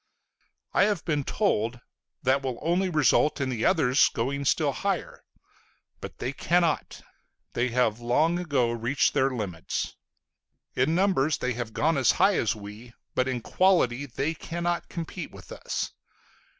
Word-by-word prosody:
I - - +5
have 205 -5 -1
been 150 -4 0
told, 120 - 0 0.4
"That 135 +2 +3
will 130 -3 -3
only 180 +4 +1
result 150 -1 +3
in 135 -1 -1
the 120 -3 -2
others 150 -7 +4
going 140 +4 -2
still 145 +1 +2
higher." 195 +7 -3 0.8
But - - -9
they 130 - -3
cannot. 170 +2 0 0.5
They 120 +1 +1
have 120 -2 +1
long 150 +9 +2
ago 140 -9 +1
reached 120 +4 +1
their 135 +1 +3
limits.... 100 -10 -4 0.8
In 145 +6 +2
numbers 170 -7 +2
they 125 - -1
have 115 -2 -5
gone 160 0 +1
as 125 -4 +4
high 195 +1 +3
as 110 - +1
we, 105 +3 -10 0.2
but 130 - +1
in 125 -2 -2
quality 145 -6 +2
they 140 +5 -2
cannot 170 +2 -3
compete 170 -2 -6
with - - -14
us. - - -4
135 Hz, 150 wpm, -27 LUFS, 120-165 Hz, 0.8 s, I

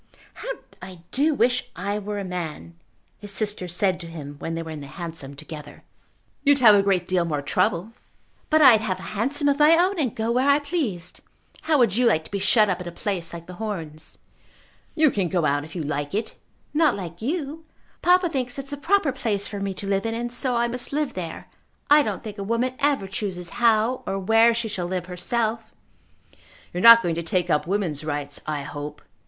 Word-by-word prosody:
"How - - -8 0.3
I 180 -3 -10
do 295 +3 +2
wish 245 0 +1
I 200 +3 -2
were 205 0 -5
a 200 - -3
man!" 175 -3 -5 0.5
his 205 - -9
sister 205 -2 -2
said 180 +1 0
to 170 - -7
him 150 -3 -8
when 165 - -4
they 165 - -3
were 160 - -7
in 155 -2 -7
the 140 - -8
hansom 160 -3 -6
together. 150 0 -10 0.6
"You'd 285 -1 +5
have 235 -5 +8
a 200 - +5
great 190 -3 +1
deal 185 -2 +2
more 150 -4 -2
trouble." 180 +5 0 0.6
"But 310 0 +5
I'd 235 -6 +8
have 195 -4 -2
a - - -10
hansom 275 +8 +1
of 285 0 +2
my 310 +2 +6
own, 365 +2 +2
and 255 -8 -1
go 225 +1 -1
where 255 +4 +2
I 280 - +6
pleased. 285 - -3 0.4
How 315 -2 +2
would 230 -6 +3
you 250 -1 +4
like 160 -8 +2
to - - -14
be 200 - -2
shut 210 +2 +4
up 185 -2 -1
at 180 - -7
a - - -5
place 175 -2 -3
like 170 -1 -8
The 180 +2 -11
Horns?" 165 -8 -6 0.8
"You 310 -3 +4
can 195 -4 0
go 170 -2 0
out 145 0 +1
if 160 - -11
you 170 - -3
like 145 +3 -3
it." 220 +1 -2 0.4
"Not 305 -3 +3
like 175 -2 -7
you. 305 +4 -3 0.4
Papa 360 +1 +4
thinks 260 -5 -3
it's 275 0 -6
the 285 - -3
proper 325 0 +2
place 205 -5 -1
for 205 - -5
me 195 0 -2
to 200 - -5
live 195 +2 0
in, 225 - -2
and 240 +1 -4
so 250 0 0
I 235 0 +2
must 240 +1 -4
live 295 0 -1
there. 170 -3 -6 0.4
I 300 +1 +8
don't - - -3
think 210 -2 -7
a - - -3
woman 230 +5 0
ever 280 -8 +1
chooses 190 -3 -4
how 230 +2 +3
or 195 - -1
where 225 +4 +4
she 235 -1 -1
shall 190 -5 -3
live 180 -1 -3
herself." 220 +5 -2 1.0
"You 175 - -2
are - - -2
not 230 +1 +10
going 170 - 0
to 170 - -2
take 175 +1 0
up 150 - +1
woman's 175 -7 -1
rights, 145 -2 -4
I 150 -2 -2
hope." 145 +1 -7
200 Hz, 220 wpm, -24 LUFS, 170-245 Hz, 1.0 s, not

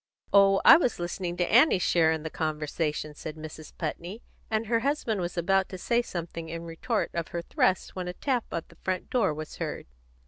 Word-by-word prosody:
"Oh, 195 -1 +6
I - - +11
was 250 -8 0
listening 175 0 -4
to 175 0 0
Annie's 240 - +5
share 165 -2 +4
in 160 -1 -2
the 160 - -5
conversation," 155 -1 -2
said 155 +1 -7
Mrs. 155 0 -9
Putney; 175 +7 -5 0.3
and 220 0 0
her 230 +1 +2
husband 240 -6 -1
was 175 0 -4
about 190 +2 +2
to 185 - -6
say 235 +6 +1
something 170 -6 -6
in 165 0 -5
retort 170 +8 -2
of 170 -1 -2
her 170 -1 -4
thrust 185 +2 0
when 180 -1 -4
a 180 - -3
tap 250 +3 -1
on 165 - -2
the - - -19
front 185 -1 -3
door 225 -9 +2
was 155 0 -7
heard. - - -4
175 Hz, 205 wpm, -28 LUFS, 160-215 Hz, 0.3 s, I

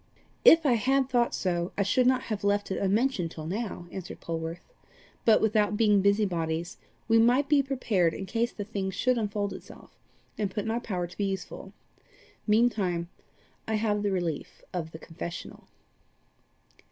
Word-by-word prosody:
"If 325 -1 +8
I 265 - +5
had 265 +3 +2
thought 240 -2 +2
so, 175 -1 -1
I 200 - +3
should 250 +6 +3
not 255 0 +3
have 215 -3 -4
left 205 0 +1
it - - -1
unmentioned 200 -2 +1
till 155 -1 -8
now," 195 0 -4
answered 185 -2 -7
Polwarth. 165 - -6 0.5
"But 220 -2 +5
without 210 -1 +2
being 210 -3 +4
busybodies, 180 -4 0 0.3
we 225 0 +5
might 245 +5 +4
be 295 -1 +4
prepared 220 - 0
in 195 - -5
case 230 +5 -1
the 205 - -5
thing 200 -2 -3
should 245 +6 +1
unfold 205 -1 -2
itself, - - -12 0.5
and 205 -2 0
put 210 - -3
it - - -8
in 220 - -1
our 235 - 0
power 185 -7 -3
to 175 - -13
be 205 - +1
useful. 195 0 -5 0.8
Meantime 205 -6 +2 0.6
I 220 - 0
have 210 -1 0
the 205 - 0
relief 175 -5 -3
of 170 -3 -3
the 160 - -8
confessional." 170 +2 -8
205 Hz, 170 wpm, -28 LUFS, 180-230 Hz, 0.8 s, If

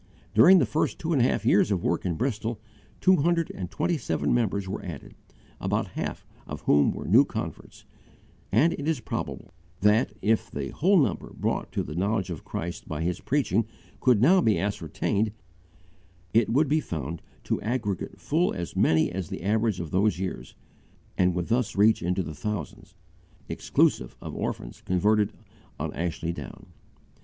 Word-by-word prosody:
During 175 - +8
the 150 - +4
first 110 - -1
two 165 +1 -2
and 135 - +3
a - - +5
half - - 0
years 105 - +4
of 95 -4 0
work 85 +2 0
in 85 - -1
Bristol, 115 -1 -2 0.4
two 185 0 +5
hundred 165 +2 +1
and 90 -2 -6
twenty 170 -3 -1
seven 75 - 0
members 100 -5 0
were 95 - -4
added, 80 -6 -8 0.5
about - - -1
half - - -5 0.2
of - - -6
whom 70 -1 +4
were - - -6
new - - +6
converts, - - -7 0.7
and 145 - +4
it 145 - -5
is 160 -4 +1
probable 110 - -5 0.3
that, 105 +1 +3
if 110 +1 +2
the 70 -1 -4
whole 190 +5 +3
number 140 - 0
brought - - -2
to - - 0
the 75 - -7
knowledge 95 +1 0
of 80 - -6
Christ 85 +1 -5
by 80 +1 -3
his 90 +1 -2
preaching 130 -5 +1 0.3
could 120 -4 +4
now 185 +6 +6
be 110 -9 +3
ascertained, 105 +1 -1 1.0
it 115 -1 +4
would 145 +6 +3
be 155 +3 +2
found 80 - -5 0.2
to - - -1
aggregate 110 -4 -3
full 170 +5 +1
as 85 -2 -5
many 80 0 +3
as 90 -2 -4
the - - -6
average 110 0 +1
of 85 -3 -5
those 100 +2 +2
years, 95 0 -5 0.6
and 90 -1 +2
would 90 -1 -1
thus 120 -1 0
reach 105 +3 +4
into 90 +2 0
the 80 - -6
thousands, 90 -1 -5 0.5
exclusive - - +1
of - - -7
orphans - - -4
converted 105 +3 +2 0.5
on - - -3
Ashley 85 +1 -2
Down. - - -10
105 Hz, 170 wpm, -27 LUFS, 90-125 Hz, 1.0 s, During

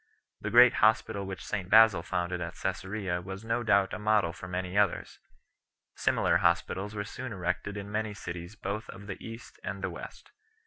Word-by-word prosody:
The - - -3
great 120 +1 +8
hospital 105 -2 +3
which 95 -1 -6
St 95 -4 -3
Basil 110 -4 +7
6 - - -15
founded 90 0 -1
at 85 0 -5
Csesarea 95 -1 -3
was 95 +3 -7
no 115 +2 0
doubt 100 -4 +3
a - - -4
model 105 -5 +2
for 90 - -9
many 90 +1 -4
others. 100 -3 +1 0.7
Similar - - +2
hospitals 95 +3 0
were 100 - -2
soon 130 +4 -7
erected 90 +1 -3
in 100 0 -6
many 105 -1 -2
cities 90 0 -7
both 105 +1 -4
of 100 +1 -10
the 100 -2 -7
East 115 +1 -10
and 95 +2 -5
the 90 - -1
West. - - -10
100 Hz, 185 wpm, -29 LUFS, 90-105 Hz, 0.7 s, great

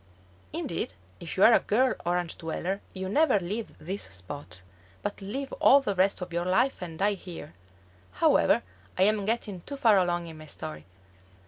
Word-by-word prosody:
Indeed, 95 - -3 0.2
if 170 - -6
you 190 - +4
are 230 - +8
a - - +7
girl 250 +5 +2
Orange 175 -1 0
dweller 180 +4 -3
you 190 0 -5
never 285 +1 +3
leave 205 +5 -4
this 190 +5 -5
spot, 90 +1 -7 0.4
but 205 0 -4
live 265 +8 -5
all 280 - +7
the 235 -7 -1
rest 190 +1 +2
of 180 -1 -6
your 170 0 0
life 190 +9 +1
and 165 -3 -6
die 205 +4 +2
here. 180 - -9 0.6
However, - - +4 0.3
I 185 - +4
am 210 0 +3
getting 210 -4 -2
too 280 +10 -7
far 225 -7 +5
along 175 -1 0
in 160 -2 -9
my 155 - -11
story. 75 - -7
185 Hz, 180 wpm, -28 LUFS, 170-210 Hz, 0.6 s, are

